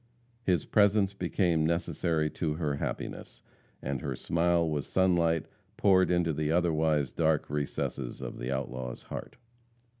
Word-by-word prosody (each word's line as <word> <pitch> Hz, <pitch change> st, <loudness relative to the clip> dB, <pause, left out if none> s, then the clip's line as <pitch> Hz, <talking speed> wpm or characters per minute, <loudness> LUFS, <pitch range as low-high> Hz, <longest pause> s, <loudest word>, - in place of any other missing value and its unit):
His 90 Hz, -8 st, +1 dB
presence 100 Hz, -1 st, +3 dB
became 90 Hz, -3 st, +1 dB
necessary 80 Hz, -1 st, 0 dB
to 75 Hz, -1 st, -2 dB
her 75 Hz, -3 st, -1 dB
happiness, -, -, -5 dB, 0.4 s
and 70 Hz, -1 st, -2 dB
her -, -, -3 dB
smile 85 Hz, 0 st, +1 dB
was 75 Hz, -3 st, -2 dB
sunlight 85 Hz, -3 st, +2 dB, 0.3 s
poured 95 Hz, -2 st, +4 dB
into 85 Hz, -2 st, +2 dB
the 75 Hz, +1 st, -1 dB
otherwise 80 Hz, -4 st, +2 dB
dark 80 Hz, -3 st, +1 dB
recesses 70 Hz, -3 st, -3 dB
of -, -, -6 dB
the 60 Hz, +2 st, -3 dB
outlaw's 65 Hz, -2 st, -4 dB
heart. -, -, -7 dB
80 Hz, 130 wpm, -30 LUFS, 75-90 Hz, 0.4 s, poured